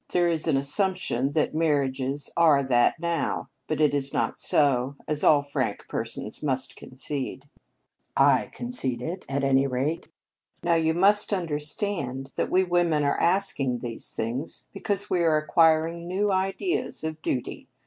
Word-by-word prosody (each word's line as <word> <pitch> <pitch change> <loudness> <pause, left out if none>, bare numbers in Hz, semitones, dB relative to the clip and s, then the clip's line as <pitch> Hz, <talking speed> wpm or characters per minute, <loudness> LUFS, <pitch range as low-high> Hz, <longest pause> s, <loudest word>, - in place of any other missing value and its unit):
There 175 -1 +2
is 165 -1 -1
an 150 -4 +3
assumption 140 - 0
that 155 - +1
marriages 140 -3 0
are 155 -5 +5
that 125 +4 +2
now, 170 0 -2 0.2
but 155 - -2
it 150 -2 +3
is 140 -1 -1
not - - -1
so, 135 -2 +2
as 150 -1 -1
all 145 -2 +5
frank 140 0 -3
persons - - -4
must 135 -3 -1
concede." 135 +1 -6 0.7
"I - - +4
concede 135 - -2
it, 180 +5 -5
at 140 0 -1
any 135 0 +3
rate." 135 +6 -2 0.6
"Now, 170 0 +2
you 160 -1 +2
must 205 +4 +3
understand 150 -5 -3
that - - -1
we 185 +1 +3
women 175 -4 +1
are 140 - +1
asking 170 -9 +1
these 115 -2 -4
things 120 +7 -4
because 200 -1 -2
we 180 - +2
are 160 -2 +4
acquiring 165 +1 +2
new 200 +3 0
ideas 195 - -1
of 160 0 -4
duty. 125 -4 -3
155 Hz, 150 wpm, -26 LUFS, 135-175 Hz, 0.7 s, are